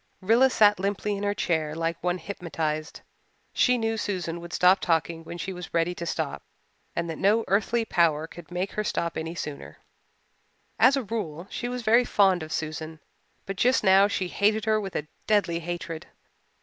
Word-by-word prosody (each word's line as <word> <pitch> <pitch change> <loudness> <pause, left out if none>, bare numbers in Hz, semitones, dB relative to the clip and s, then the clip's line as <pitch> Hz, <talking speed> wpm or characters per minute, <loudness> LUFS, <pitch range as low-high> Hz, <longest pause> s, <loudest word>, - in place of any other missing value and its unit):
Rilla 230 +7 +4
sat 210 -5 +4
limply 200 +1 -1
in 200 - -5
her 205 0 0
chair 155 -5 -1
like 165 0 -2
one 180 0 +1
hypnotized. 160 -4 -4 0.5
She 250 -1 +3
knew 225 -1 -1
Susan 180 -5 -3
would 170 0 -9
stop 185 +2 +5
talking 165 -1 0
when 170 +1 -8
she 190 +2 -4
was 180 -2 -8
ready 170 +1 +2
to 170 -1 -6
stop - - -3 0.5
and 170 0 -1
that 165 -2 -5
no 215 +3 +3
earthly 220 +4 +1
power 160 -6 +2
could 165 0 -12
make 180 +2 -3
her 215 - -2
stop 170 -5 -2
any 160 +1 -4
sooner. 150 -4 -7 1.0
As 270 +2 +6
a 270 - -1
rule, 190 -7 -4
she 245 - -3
was 250 -1 -4
very 230 +3 +5
fond 195 -6 +3
of 155 0 -7
Susan 155 0 -4 0.5
but 195 -1 -5
just 250 +5 +3
now 195 +1 +6
she 190 -2 -2
hated 210 +3 +1
her 215 -1 +2
with 195 -2 -6
a 150 - -2 0.2
deadly 200 -6 +2
hatred. 170 -1 -5
180 Hz, 185 wpm, -26 LUFS, 165-210 Hz, 1.0 s, As